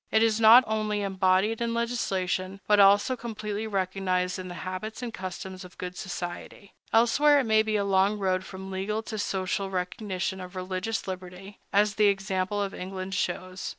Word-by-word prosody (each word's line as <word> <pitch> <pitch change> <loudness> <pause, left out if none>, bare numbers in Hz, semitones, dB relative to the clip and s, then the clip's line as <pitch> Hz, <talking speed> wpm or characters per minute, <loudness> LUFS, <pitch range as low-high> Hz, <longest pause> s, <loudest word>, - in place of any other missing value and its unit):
It 220 0 +4
is 225 -1 +2
not 230 +3 +9
only 215 -1 -1
embodied 190 +3 +1
in 230 0 -1
legislation, 195 -5 -1
but 210 -1 +4
also 205 +6 +5
completely 215 -2 -5
recognized 185 -2 -1
in 185 - -6
the 175 - -7
habits 200 +6 -5
and 235 -2 -5
customs 185 0 -6
of 180 -1 -14
good 180 0 -6
society. 180 +2 -7 0.2
Elsewhere 285 +6 +5
it - - +1
may 220 -2 +4
be 215 0 -1
a 200 -1 +1
long 195 +1 +3
road 185 -2 0
from 190 0 -8
legal 205 +4 -2
to 220 -1 -5
social 195 0 -1
recognition 185 0 -3
of 180 +1 -9
religious 185 +4 -3
liberty, 185 +1 -8
as 205 +1 +3
the 210 -1 +5
example 195 0 0
of 195 - -4
England 185 +1 -6
shows. 185 0 -3
195 Hz, 175 wpm, -27 LUFS, 185-215 Hz, 0.2 s, not